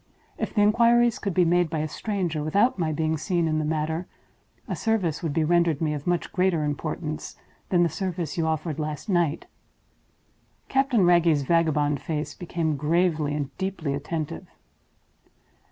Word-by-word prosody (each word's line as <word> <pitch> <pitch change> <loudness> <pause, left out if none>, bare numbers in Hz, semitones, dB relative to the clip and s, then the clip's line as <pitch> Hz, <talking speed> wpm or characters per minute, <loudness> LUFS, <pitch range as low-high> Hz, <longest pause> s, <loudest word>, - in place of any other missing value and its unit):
If - - -4
the 210 - +4
inquiries 235 +2 +4
could 200 -5 -3
be 180 - +4
made 175 0 +2
by 160 - -2
a 155 0 -1
stranger, 175 -3 -2
without 200 +8 +2
my 160 -2 0
being 155 +1 0
seen 170 +1 0
in 155 -1 0
the - - -1
matter, 160 +3 -2 0.6
a - - -2
service 205 -9 0
would 165 -4 -2
be 160 +2 +1
rendered 170 -2 +2
me 155 -2 0
of 145 +1 -6
much 175 -1 -1
greater 180 -4 +2
importance 150 +1 -4 0.3
than 175 -2 +4
the - - +4
service 175 -2 -3
you 165 -2 0
offered 160 -1 -2
last 155 +6 -4
night." 170 -5 +1 1.2
Captain 265 -7 +3
Wragge's 170 -4 +4
vagabond 150 -2 +1
face 155 -1 -3
became 165 -3 -2
gravely 155 -1 +1
and 140 -2 -4
deeply 190 -7 -2
attentive. 145 - -4
165 Hz, 160 wpm, -25 LUFS, 155-180 Hz, 1.2 s, the